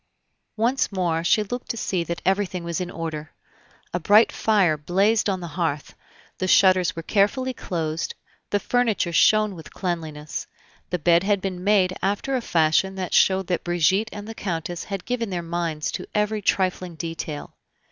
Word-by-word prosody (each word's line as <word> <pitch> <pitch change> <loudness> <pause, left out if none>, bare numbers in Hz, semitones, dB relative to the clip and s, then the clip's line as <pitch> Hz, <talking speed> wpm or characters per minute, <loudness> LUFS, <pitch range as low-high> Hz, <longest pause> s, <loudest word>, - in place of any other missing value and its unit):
Once 240 +4 +1
more 175 -4 0
she 210 +5 +3
looked 245 +4 -6
to 230 - -2
see 185 -5 -1
that 170 +1 -5
everything 190 -2 0
was 170 0 -3
in 180 - -3
order. 160 -3 -5 0.6
A 175 - 0
bright 205 +6 +5
fire 200 -8 +2
blazed 195 +8 +2
on 190 -2 -1
the 170 - -6
hearth, 160 -4 -2 0.5
the 185 - -1
shutters 185 -1 +4
were 165 - -5
carefully 255 +8 +1
closed, 165 -7 -3 0.3
the 205 - +1
furniture 225 -7 0
shone 215 +4 +4
with 165 -3 -11
cleanliness, 160 -5 -4 0.4
the 180 - 0
bed 170 +1 +4
had 200 +1 +1
been 185 -1 -4
made 190 -2 +3
after 205 +8 0
a 255 - 0
fashion 170 +1 +2
that 185 -2 -4
showed 190 0 +4
that 175 -1 -1
Brigitte 180 +5 +2
and 205 0 -8
the 225 - -6
Countess 175 -4 -4
had 195 -3 -5
given 235 -2 -2
their 175 -2 -3
minds 165 -2 -2
to - - -5
every 210 0 +1
trifling 185 -2 0
detail. 165 -2 -5
185 Hz, 170 wpm, -24 LUFS, 170-205 Hz, 0.6 s, bright